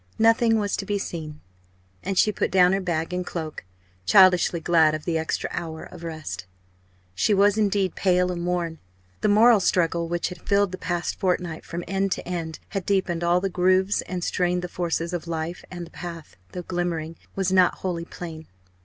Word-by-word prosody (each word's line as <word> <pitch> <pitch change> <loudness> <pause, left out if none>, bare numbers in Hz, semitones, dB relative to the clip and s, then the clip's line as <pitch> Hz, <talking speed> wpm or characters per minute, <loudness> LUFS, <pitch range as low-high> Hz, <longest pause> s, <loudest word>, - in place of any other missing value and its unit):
Nothing 225 0 +4
was 205 -2 0
to 195 - -4
be 205 - 0
seen; 155 -5 -6 0.6
and 195 -1 -3
she 215 - +5
put - - -1
down 180 -1 +5
her 195 - +1
bag 170 -1 -2
and 180 0 -1
cloak, 160 -3 -5 0.4
childishly 180 - +6
glad 160 -2 +4
of 155 - -7
the 165 -2 0
extra 160 - -2
hour 160 -2 -5
of 170 - -11
rest. 155 - -6 0.7
She 150 - +2
was, 200 +1 +4
indeed, 200 -4 +1
pale 180 -1 +2
and 170 -1 -4
worn. 175 -2 -2 0.4
The - - +2
moral 220 +2 +6
struggle 170 -2 +1
which 170 +1 -1
had 180 -2 -10
filled 200 -1 +2
the 185 - -6
past 175 -1 -2
fortnight 180 -3 -1
from 170 +1 -5
end 195 0 0
to - - -7
end 165 -3 -4
had 195 -3 -3
deepened 185 -4 0
all 175 +1 +3
the 195 - 0
grooves 185 +2 +2
and 180 -1 -4
strained 180 0 0
the - - -2
forces 170 -1 -2
of 175 -1 -4
life; 165 +1 -4
and 175 -2 -6
the 165 - -16
path, 170 -3 -8 0.2
though 180 - -5
glimmering, 170 -2 -3 0.2
was 190 -1 0
not 185 -2 +5
wholly 170 -3 -3
plain. 160 -3 -8
180 Hz, 190 wpm, -25 LUFS, 165-190 Hz, 0.7 s, childishly